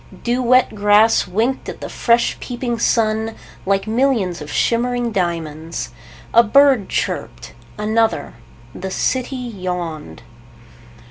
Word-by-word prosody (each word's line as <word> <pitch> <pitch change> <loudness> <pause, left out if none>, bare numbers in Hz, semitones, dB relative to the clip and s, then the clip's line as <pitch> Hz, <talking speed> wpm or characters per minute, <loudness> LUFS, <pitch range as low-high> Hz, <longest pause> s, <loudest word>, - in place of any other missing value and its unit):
Dew 245 +1 0
wet 255 0 +3
grass 210 +1 +4
winked 225 +8 -1
at - - -8
the - - -6
fresh 235 0 +1
peeping 240 -1 -4
sun, 220 -1 +1 0.3
like 195 0 +1
millions 220 - 0
of 150 - -8
shimmering 240 0 0
diamonds. 165 - -3 0.4
A 235 - +8
bird 260 -2 +4
chirped. - - -3 0.2
Another. 220 +2 0 0.4
The 190 - -6
city 260 +7 -1
yawned. 180 - -5
220 Hz, 115 wpm, -19 LUFS, 185-245 Hz, 0.4 s, A